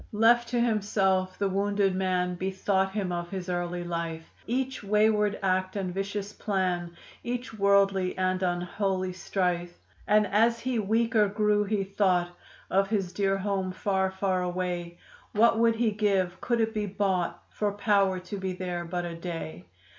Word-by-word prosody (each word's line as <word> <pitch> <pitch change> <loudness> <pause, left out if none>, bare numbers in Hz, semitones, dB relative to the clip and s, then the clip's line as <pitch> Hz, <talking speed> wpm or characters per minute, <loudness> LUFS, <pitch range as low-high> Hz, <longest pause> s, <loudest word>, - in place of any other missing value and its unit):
Left 235 +3 +4
to 240 0 0
himself 195 -5 +1
the 200 - +1
wounded 200 0 +1
man 185 -1 0
Bethought 190 +1 0
him 200 -4 -2
of 175 0 -3
his 185 -1 -5
early 175 0 -2
life, 170 -1 -4
Each 260 +1 -2
wayward 210 0 +2
act 185 0 0
and 190 -3 -2
vicious 200 +1 -3
plan, 180 -4 -2 0.3
Each 245 0 -4
worldly 200 -2 +2
and 185 0 0
unholy 185 +1 -1
strife. 175 -1 -2 0.3
And 210 0 +4
as 230 +3 +3
he 255 -2 -1
weaker 220 +1 +2
grew 210 0 +2
he 205 -1 0
thought 190 -3 +1 0.4
Of 195 +1 +2
his 195 -4 -1
dear 195 0 +1
home, 195 -1 -1
far, 190 0 0
far 190 -1 -1
away; 175 -1 -3 0.4
What 225 +1 +4
would 230 0 +4
he 225 -1 +1
give 195 -4 0
could 235 -2 +1
it 225 0 0
be 210 -2 -1
bought 190 -3 -1
For 210 -1 -1
power 200 -2 +2
to 185 +3 -6
be 190 -1 -2
there 180 -1 -4
but 175 +1 -3
a 170 - -5
day. 165 - -6
195 Hz, 160 wpm, -28 LUFS, 180-210 Hz, 0.4 s, Left